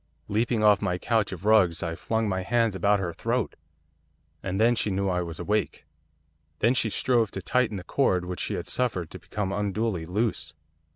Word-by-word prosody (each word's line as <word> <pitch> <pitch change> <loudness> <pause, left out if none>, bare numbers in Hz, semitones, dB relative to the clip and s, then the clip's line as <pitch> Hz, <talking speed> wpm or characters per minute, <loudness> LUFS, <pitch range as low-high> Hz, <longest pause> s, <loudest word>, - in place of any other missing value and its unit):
Leaping 110 +1 +1
off 105 -1 +5
my 90 -3 0
couch 110 +1 0
of 95 +1 -7
rugs, 95 -6 +4
I 85 -1 -2
flung 110 +5 -1
my 95 -2 -1
hands 115 +1 +1
about 100 +1 +3
her 90 -3 -3
throat, 115 +6 -1 0.9
and 95 +1 -3
then 115 +2 +5
she 110 - 0
knew 100 0 0
I 90 -1 0
was 85 -2 -6
awake. 105 +4 -1 0.7
Then 115 +8 +3
she 115 -3 +1
strove 115 0 +1
to 95 - -6
tighten 120 -3 +1
the 90 - -7
cord 90 -5 +1
which 90 -1 -5
she - - -2
had - - -5
suffered 105 -10 -1
to 95 - -8
become 95 +3 -3
unduly 100 -3 -1
loose. 90 -5 -1
100 Hz, 190 wpm, -26 LUFS, 90-115 Hz, 0.9 s, off